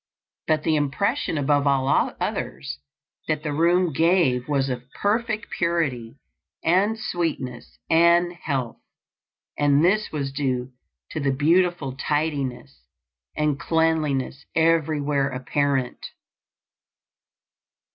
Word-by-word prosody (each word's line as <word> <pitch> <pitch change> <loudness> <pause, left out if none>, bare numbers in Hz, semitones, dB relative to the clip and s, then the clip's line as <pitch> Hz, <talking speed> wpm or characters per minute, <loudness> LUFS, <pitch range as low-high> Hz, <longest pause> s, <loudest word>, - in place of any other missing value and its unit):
But 155 -1 +1
the 160 - +2
impression 155 - 0
above 145 0 +2
all 135 -1 +2 0.3
others 65 +2 -4 0.5
that 155 -1 -1
the 150 -2 -2
room 170 +2 +2
gave 160 -6 +2
was 140 -2 +1
of 125 0 -5
perfect 215 +1 -1
purity 145 -10 -1 0.5
and 195 +6 +2
sweetness 155 - -4
and 170 +1 +4
health; 135 -8 -3 0.8
and 145 +2 +4
this 210 +4 +2
was 140 -3 -3
due 130 -2 -2 0.4
to 155 - -3
the 140 -1 0
beautiful 160 0 +1
tidiness 140 -3 -2 0.6
and 150 -2 0
cleanliness 155 -5 0
everywhere 150 -4 +2
apparent. 135 0 -1
150 Hz, 100 wpm, -24 LUFS, 135-170 Hz, 0.8 s, and